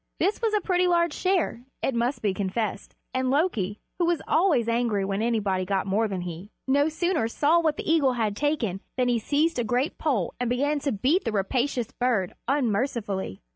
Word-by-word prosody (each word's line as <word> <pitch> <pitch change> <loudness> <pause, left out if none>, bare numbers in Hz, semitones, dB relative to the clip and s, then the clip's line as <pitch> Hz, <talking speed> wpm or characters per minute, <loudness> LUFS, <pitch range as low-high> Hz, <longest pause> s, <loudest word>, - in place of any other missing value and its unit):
This 400 - +1
was 445 -2 +1
a 420 - +2
pretty 360 -1 +2
large 340 -2 +2
share, 365 -10 0 0.2
it 270 - +1
must 235 +3 -1
be 205 -3 +2
confessed, 200 +2 -3 0.2
and 260 0 0
Loki, 250 - 0 0.2
who 345 - +3
was 345 -1 +2
always 315 - +3
angry 230 -4 +1
when 195 +1 -1
anybody 210 -5 0
got 190 0 -1
more 205 +3 +1
than 190 -3 -3
he, 175 +3 -7 0.2
no 285 +3 +3
sooner 325 -5 0
saw 300 +8 +3
what 315 -3 +1
the - - -5
eagle 310 -5 +3
had 220 -4 -1
taken, 240 -9 -1 0.2
than 250 -1 +2
he 240 -1 +2
seized 295 +5 +1
a - - +1
great 245 +6 -1
pole 250 - 0
and 245 -1 -1
began 285 +4 +1
to 280 0 -1
beat 270 - +1
the - - -1
rapacious 240 +4 -1
bird 235 -8 0
unmercifully. 225 - -1
245 Hz, 195 wpm, -26 LUFS, 205-300 Hz, 0.2 s, who